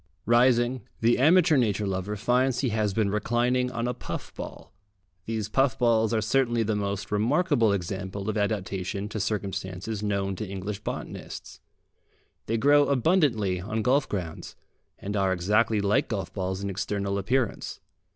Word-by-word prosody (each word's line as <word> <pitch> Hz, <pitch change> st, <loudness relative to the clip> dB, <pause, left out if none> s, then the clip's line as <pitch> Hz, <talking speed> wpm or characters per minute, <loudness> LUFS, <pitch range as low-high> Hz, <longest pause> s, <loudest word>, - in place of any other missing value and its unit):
Rising, 120 Hz, +1 st, +3 dB, 0.2 s
the 115 Hz, +2 st, +3 dB
amateur 160 Hz, +2 st, +5 dB
nature 105 Hz, -4 st, +1 dB
lover 95 Hz, +2 st, -2 dB
finds 125 Hz, +4 st, +1 dB
he 130 Hz, -, +1 dB
has 110 Hz, -2 st, 0 dB
been 100 Hz, 0 st, 0 dB
reclining 120 Hz, +4 st, +1 dB
on 120 Hz, -1 st, -2 dB
a 125 Hz, -, -1 dB
puff -, -, -7 dB
ball. -, -, -9 dB, 0.5 s
These 110 Hz, -2 st, -2 dB
puff 135 Hz, -2 st, +2 dB
balls 115 Hz, -2 st, +3 dB
are 110 Hz, -2 st, +1 dB
certainly 120 Hz, +1 st, +2 dB
the 110 Hz, 0 st, 0 dB
most 100 Hz, -1 st, -3 dB
remarkable 120 Hz, -, +2 dB
example 95 Hz, +1 st, -3 dB
of 110 Hz, -, -1 dB
adaptation 100 Hz, -2 st, -2 dB
to 110 Hz, -, -4 dB
circumstances 100 Hz, -1 st, -3 dB
known 100 Hz, -2 st, -1 dB
to 110 Hz, -, -4 dB
English 100 Hz, +1 st, -4 dB
botanists. -, -, -7 dB, 0.9 s
They 115 Hz, -, 0 dB
grow 145 Hz, +4 st, +5 dB
abundantly 125 Hz, -, +2 dB
on 105 Hz, +3 st, -2 dB
golf 135 Hz, +4 st, +2 dB
grounds, 85 Hz, -6 st, -5 dB, 0.4 s
and 100 Hz, +1 st, -5 dB
are 95 Hz, -2 st, +2 dB
exactly 105 Hz, +4 st, +2 dB
like 100 Hz, +1 st, +2 dB
golf 95 Hz, -6 st, -3 dB
balls 95 Hz, 0 st, -3 dB
in 100 Hz, -, -2 dB
external 100 Hz, 0 st, -2 dB
appearance. 120 Hz, +2 st, -1 dB
110 Hz, 150 wpm, -27 LUFS, 100-120 Hz, 0.9 s, amateur